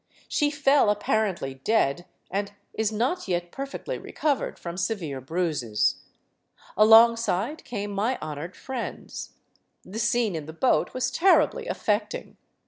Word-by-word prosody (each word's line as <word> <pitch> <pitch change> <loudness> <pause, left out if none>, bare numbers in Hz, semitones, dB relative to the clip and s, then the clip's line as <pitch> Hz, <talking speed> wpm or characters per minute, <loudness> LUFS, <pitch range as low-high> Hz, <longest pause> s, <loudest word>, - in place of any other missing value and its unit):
She 295 - +1
fell, 285 -4 +3
apparently 205 -8 0
dead, 175 -7 +1 0.2
and 200 +1 -2 0.2
is 220 -1 0
not 245 - -1
yet 175 -1 -1
perfectly 275 - -5
recovered 290 -4 -1
from 170 -1 -6
severe 175 -9 -2
bruises. 145 -8 0 0.8
Alongside 225 - +5
came 205 -3 -4
my 215 +6 0
honored 155 +3 -6
friends. 260 -3 -6 0.5
The 210 +4 -6
scene 230 -3 +1
in 155 -2 -5
the 160 - -7
boat 255 +10 +1
was 255 0 0
terribly 390 - +3
affecting. 210 - -2
210 Hz, 125 wpm, -26 LUFS, 175-250 Hz, 0.8 s, Alongside